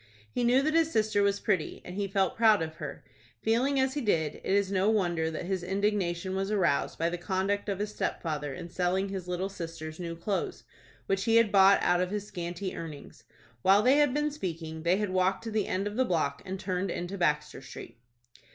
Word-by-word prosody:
He 245 - -1
knew 250 +3 +4
that 310 +2 +1
his 325 -1 +3
sister 215 -4 +2
was 200 0 +2
pretty, 185 -7 -1
and 180 - -7
he 200 0 -1
felt 195 -1 +1
proud 220 -5 +5
of 160 0 -7
her. - - -7 0.4
Feeling 255 +5 +2
as 265 0 +2
he 295 - -2
did, 160 - +1
it - - -2
is 200 -1 +2
no 195 +1 +2
wonder 175 -7 +1
that 160 +1 -5
his 190 0 -1
indignation 190 -1 -1
was 195 +1 -1
aroused 185 -9 +1
by 165 - +1
the 175 +1 -3
conduct 195 +3 -1
of 195 - -1
his 210 +1 -3
stepfather 150 -7 -2
in 170 +5 -8
selling 185 +2 0
his 190 -2 -5
little 180 +1 -2
sister's 165 -4 -7
new 170 -2 -4
clothes, 195 +4 -3 0.4
which 195 +1 0
he 225 -1 +3
had 230 -3 +5
bought 195 0 +6
out 175 0 +3
of 180 - 0
his 205 0 -3
scanty 175 0 -5
earnings. 155 -4 -9 0.4
While 195 - +5
they 260 +4 +5
had 295 -3 +4
been 295 +2 0
speaking, 165 - -5
they 170 +3 +2
had 210 -2 -1
walked 185 +3 +1
to 225 - -5
the 215 -2 0
end 190 +2 -1
of 205 +2 -4
the 260 - +4
block 155 - 0
and 190 0 -5
turned 185 0 -2
into 175 +3 -4
Baxter 150 -6 0
Street. 135 - -10
190 Hz, 215 wpm, -29 LUFS, 170-210 Hz, 0.4 s, bought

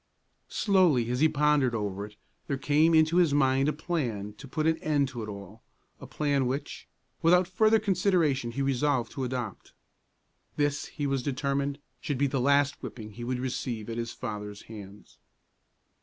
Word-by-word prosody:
Slowly, 175 - +3
as 125 - -1
he 160 +2 +5
pondered 150 -4 +2
over 100 -2 -3
it, 105 - -18 0.3
there 140 - -1
came 150 +4 +3
into 160 +2 +4
his 165 -5 +4
mind 135 0 +3
a - - +2
plan 130 - -3
to 140 - -9
put 155 +4 -2
an 160 0 +2
end 145 -3 +1
to 120 -4 -6
it 110 - -5
all, 100 +2 -9 0.4
a - - -10
plan 140 -3 0
which, 140 +3 -4 0.3
without 175 +2 +4
further 215 +4 +4
consideration, 180 - +1
he 140 - -1
resolved 135 -2 +1
to 135 - -4
adopt. 125 -5 -5 0.8
This, 145 -1 0
he 145 - -4
was 135 -2 0
determined, 140 +1 -1 0.2
should 145 - -3
be 140 - +2
the 135 -2 0
last 140 +1 +2
whipping 110 -3 -8
he 120 +3 -8
would 125 +1 -2
receive 120 -3 -3
at 115 - -4
his 115 0 -3
father's 105 -4 -6
hands. 105 -2 -12
140 Hz, 170 wpm, -28 LUFS, 120-150 Hz, 0.8 s, he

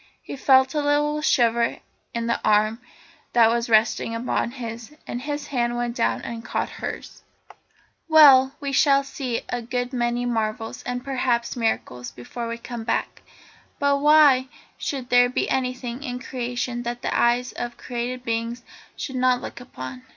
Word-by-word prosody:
He - - -7
felt 265 0 +4
a 300 - 0
little 295 +1 +1
shiver 235 -5 +2 0.3
in 235 0 -3
the 235 - -1
arm 215 +2 +2 0.5
that 230 -2 +6
was 235 0 -1
resting 225 +1 +2
upon 235 0 -1
his, 235 +1 -8
and 240 - -5
his 290 +1 -4
hand 240 -1 0
went 240 0 -2
down 230 - 0
and 230 -1 -6
caught - - -2
hers. - - -6 0.9
"Well, 275 -4 +7
we 280 -1 -3
shall 275 0 +4
see 265 -3 -4
a 245 - -2
good 245 +2 -3
many 240 0 0
marvels, 225 -1 -2
and, 245 +1 -3
perhaps, 250 -3 0
miracles, 220 - -2
before 230 - -7
we 230 0 -4
come 235 -1 -7
back, - - -2 0.6
but 285 -1 +2
why 290 -3 +6 0.3
should 265 -3 -4
there 245 0 +6
be 250 - -1
anything 250 -1 -2
in 250 -3 -4
Creation 245 -1 -4
that 240 0 -5
the - - -1
eyes 240 +1 +2
of 240 0 -6
created 250 +1 -4
beings 230 +1 -3 0.3
should 265 -2 -5
not 255 -1 +3
look - - -8
upon? 130 - -8
245 Hz, 160 wpm, -24 LUFS, 235-265 Hz, 0.9 s, Well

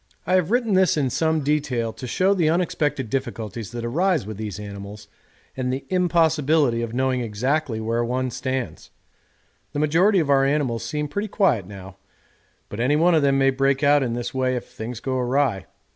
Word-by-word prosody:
I 180 - 0
have 185 -2 +3
written 235 -2 +1
this 185 -4 +3
in 135 -4 0
some 160 +2 +1
detail 135 -6 -1
to 130 - -8
show 185 +10 +2
the 170 -5 +2
unexpected 155 -6 0
difficulties 110 -3 -4
that 120 0 -5
arise 165 - +1
with 110 -1 -7
these 105 -2 -5
animals, 100 0 -9 0.5
and 125 -1 -2
the 130 +1 -4
impossibility 160 -7 +2
of 115 -1 -3
knowing 130 +1 0
exactly 125 +3 -1
where 115 +2 -1
one 125 +1 -2
stands. 130 0 -4 0.8
The 145 - -2
majority 170 +7 +3
of 155 -5 +2
our 135 -1 +4
animals 135 -5 0
seem 150 +5 -3
pretty 205 +8 -3
quiet 145 - +1
now, 95 -1 -11 0.7
but 105 - -8
any 130 +5 +2
one 170 +3 +4
of 160 - +4
them 140 -1 +3
may 135 0 +4
break 135 +1 +1
out 145 0 +5
in 120 -3 -1
this 120 0 -4
way 130 -1 0
if 125 - -4
things 115 +1 -7
go 130 0 -2
awry. 125 -5 0
135 Hz, 190 wpm, -23 LUFS, 115-155 Hz, 0.8 s, out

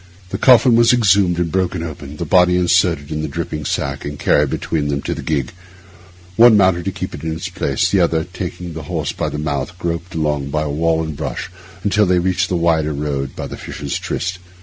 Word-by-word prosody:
The - - -3
coffin 125 -1 +6
was 115 +1 +5
exhumed 100 -6 +3
and 85 -2 -1
broken 95 -2 -1
open; 75 -2 -8
the 85 - -3
body 90 +2 +4
inserted 85 -4 +2
in 75 0 -2
the 80 - -2
dripping 75 0 -4
sack 70 0 -2
and 75 0 -5
carried 75 0 +2
between 75 +1 -2
them 70 -1 -2
to - - -2
the - - -6
gig; 70 -5 -1 0.9
one 115 -2 +8
mounted 95 -3 +3
to 95 - -1
keep - - -6
it 70 - -8
in 80 - -2
its 80 - -5
place, - - -1
and 100 - +4
the - - +5
other, 80 -1 +1
taking 90 -1 -6
the 80 - -6
horse - - -2
by - - -3
the - - -5
mouth, 75 +2 -3
groped 85 0 -4
along 75 -3 -1
by 75 +1 -1
wall 80 +2 0
and 80 -1 -5
bush 75 +4 -4 0.3
until 105 0 +2
they 90 0 +3
reached 90 +1 +1
the 90 - 0
wider 80 -2 +1
road 70 -2 -3
by - - -5
the - - -7
Fisher's 70 -2 -5
Tryst. 90 +2 -3
85 Hz, 220 wpm, -18 LUFS, 75-90 Hz, 0.9 s, one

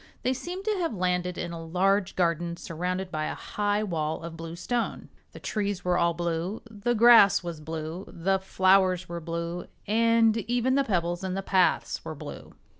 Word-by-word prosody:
They 255 - +2
seemed 360 +8 -6
to 430 -2 +1
have 330 -10 -1
landed 180 -1 -1
in 170 - -4
a 165 -1 -6
large 190 +4 +1
garden, 170 -1 0
surrounded 180 +3 -3
by 155 -2 -2
a - - -3
high 205 0 -1
wall 160 -5 -2
of 165 -1 -7
blue 165 0 -7
stone. 235 +6 -3 0.2
The - - -11
trees 200 -4 -2
were 180 0 +2
all 170 -1 +2
blue, 175 +4 -2
the 225 +3 -1
grass 230 -4 +7
was 170 -3 -5
blue, 160 +3 -5
the 190 +3 0
flowers 185 -1 +3
were 170 0 -5
blue 170 +1 -4 0.2
and 230 +1 +3
even 240 +3 0
the 275 +1 +3
pebbles 175 -5 -1
in 190 -1 -2
the 195 - -3
paths 185 -2 +1
were - - -6
blue. - - -9
185 Hz, 185 wpm, -27 LUFS, 170-210 Hz, 0.2 s, grass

